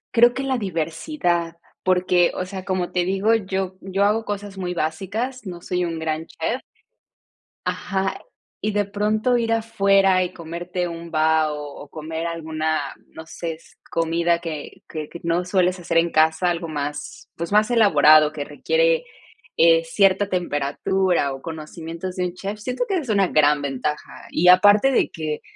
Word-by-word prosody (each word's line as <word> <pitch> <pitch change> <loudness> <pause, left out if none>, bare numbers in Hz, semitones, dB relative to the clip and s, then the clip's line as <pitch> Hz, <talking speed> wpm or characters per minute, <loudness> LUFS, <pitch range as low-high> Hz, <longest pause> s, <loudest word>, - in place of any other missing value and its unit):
Creo 240 +1 +6
que 270 - -3
la 265 -2 0
diversidad 170 - -2 0.3
porque, 180 -1 +3
o 185 - -2
sea, 190 0 -7
como 185 -2 -2
te 180 -1 +2
digo, 195 +5 +2
yo 190 -3 -2
yo 195 +1 0
hago 220 +2 +2
cosas 205 -2 -5
muy 180 -1 -3
básicas, 200 +11 -3
no 175 -2 -7
soy 180 0 -1
un 165 -2 -3
gran 160 0 -2
chef. 225 +11 -3 1.1
Ajá. 195 -1 -2 0.4
Y 215 - 0
de 205 -1 +1
pronto 215 +4 +1
ir 230 -1 0
afuera 195 -4 +3
y 180 - -5
comerte 175 +2 -4
un 170 0 -7
bao, 155 -1 +2 0.2
o 145 - -10
comer 160 +1 -5
alguna, 160 -2 -2 0.3
no 160 - -11
sé, 165 +1 -5
es 160 - -17 0.2
comida 170 +1 +1
que 160 -4 -7
que 155 -1 -6
que 170 - -9
no 170 +1 0
sueles 180 -1 +1
hacer 165 -1 -1
en 170 0 +3
casa, 160 +3 +3
algo 170 -1 -3
más, 145 -1 -5
pues 170 +3 -5
más 210 +2 +4
elaborado, 155 -8 +6
que 150 -2 -4
requiere, 485 - +1 0.5
eh, 165 0 +5
cierta 195 +3 +2
temperatura 175 -1 0
o 135 - -9
conocimientos 165 +3 -7
de 180 - 0
un 175 - -7
chef, 200 +3 -5
siento 250 - -2
que 390 - 0
esa 335 - 0
es 255 - -10
una 200 -3 +3
gran 150 -2 +3
ventaja. 140 +2 -3 0.2
Y 180 - +2
aparte 205 +8 +7
de - - +2
que, 155 -2 -4
180 Hz, 170 wpm, -22 LUFS, 160-200 Hz, 1.1 s, aparte